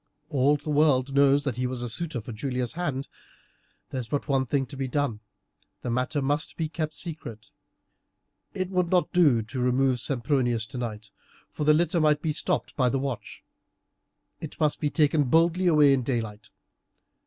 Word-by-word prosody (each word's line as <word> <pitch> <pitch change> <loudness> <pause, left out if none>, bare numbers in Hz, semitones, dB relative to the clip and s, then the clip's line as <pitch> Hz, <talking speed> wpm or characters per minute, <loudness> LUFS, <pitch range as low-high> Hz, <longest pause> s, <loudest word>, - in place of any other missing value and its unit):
All 145 0 +3
the 150 +1 -5
world 140 -3 +3
knows 140 0 +4
that 135 -5 -2
he 125 0 0
was 125 -1 -4
a - - -2
suitor 140 +2 -3
for 115 - -8
Julia's 125 +1 -2
hand. 150 -6 -3 0.8
There's 130 -3 -4
but 145 +5 -2
one 135 -2 +1
thing 135 +1 0
to 130 - -11
be 135 -1 -3
done; 130 -4 -1 0.6
the 120 - -2
matter 130 +4 -1
must 145 +3 -1
be 160 -2 -2
kept 155 -1 -4
secret. 140 - -7 1.0
It 185 0 -2
would 180 -2 +1
not 180 +1 +1
do 145 -11 +4
to - - -19
try 130 +3 -5
and 125 - +1
remove 130 0 +2
Sempronius 120 -3 0
tonight, 110 -3 -6 0.4
for 150 - -3
the 150 - +6
litter 170 +1 +1
might 150 -1 +3
be 155 -2 0
stopped - - -1
by 130 -3 +2
the 135 - 0
watch; 135 -3 -5 1.0
it - - -8
must 150 -1 +1
be 150 - 0
taken 150 -1 +2
boldly 165 +6 +3
away 150 -4 +6
in 135 - +1
daylight. 110 -5 -4
140 Hz, 180 wpm, -26 LUFS, 125-150 Hz, 1.0 s, the